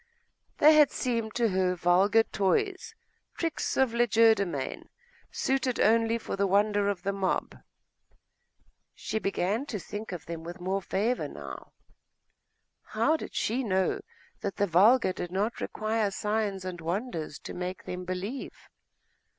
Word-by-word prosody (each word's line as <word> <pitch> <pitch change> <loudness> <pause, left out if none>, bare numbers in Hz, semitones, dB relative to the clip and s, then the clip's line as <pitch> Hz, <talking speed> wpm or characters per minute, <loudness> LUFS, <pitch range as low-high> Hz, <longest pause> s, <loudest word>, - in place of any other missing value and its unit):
They 305 +2 +7
had 300 -1 +6
seemed 230 -4 -2
to 235 -2 +2
her 185 -1 +1
vulgar 185 +6 +4
toys, 380 - -1 0.4
tricks 330 -2 -2
of 265 -3 +3
legerdemain, 220 - +2 0.4
suited 265 -2 -1
only 225 +1 +3
for 230 - -5
the 200 0 +1
wonder 205 +1 +2
of 185 -3 -3
the 200 0 -1
mob.... 195 -1 -1 1.4
She 220 - -3
began 205 +6 -1
to 225 - -3
think 205 +4 -7
of 175 -4 -6
them 165 -1 -6
with 175 +2 -8
more 190 +2 -1
favour 215 +6 -1
now. - - -9 1.1
How 315 - +1
did - - -7
she 245 +5 0
know 190 - +1 0.4
that 200 - -3
the 205 - +2
vulgar 195 +4 +4
did 175 -1 -5
not 205 +5 -1
require 215 -1 -1
signs 205 -1 -2
and 180 -2 -5
wonders 170 - -3
to - - -9
make 180 +1 -5
them 180 0 -5
believe?.... 185 +8 -5
205 Hz, 140 wpm, -28 LUFS, 185-230 Hz, 1.4 s, They